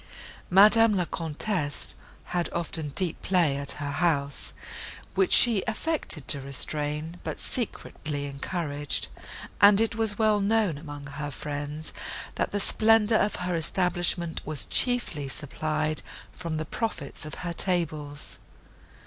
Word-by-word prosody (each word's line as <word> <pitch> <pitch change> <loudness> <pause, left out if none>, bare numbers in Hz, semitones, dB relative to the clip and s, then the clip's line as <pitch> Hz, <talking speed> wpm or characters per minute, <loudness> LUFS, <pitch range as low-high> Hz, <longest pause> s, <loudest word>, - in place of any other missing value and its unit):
Madame 215 +3 +6
La 180 - +1
Comtesse 160 -2 -2 0.4
had 175 -1 0
often 160 -2 -2
deep 180 -4 +2
play 175 -7 +2
at 140 0 -1
her 145 -1 -4
house, 140 -2 0 0.6
which 390 - +2
she 230 -5 +6
affected 220 - -2
to 140 - +5
restrain, 150 +4 -3
but - - -5
secretly 150 - -4
encouraged; 145 0 -2 0.5
and 200 0 +8
it 225 0 +2
was 220 -2 +1
well 215 -2 +3
known 200 -6 +1
among 145 -2 -8
her 145 +1 -5
friends, 145 +2 -5 0.4
that - - -1
the 205 - -1
splendour 220 +1 +4
of 210 - +1
her 180 -1 -1
establishment 175 0 +1
was 155 -2 +4
chiefly 240 - -1
supplied 155 +2 -2 0.3
from 165 -3 -5
the 155 - -3
profits 215 -12 -4
of 155 -1 -6
her 170 - -2
tables. 155 -6 -2
165 Hz, 130 wpm, -27 LUFS, 145-205 Hz, 0.6 s, and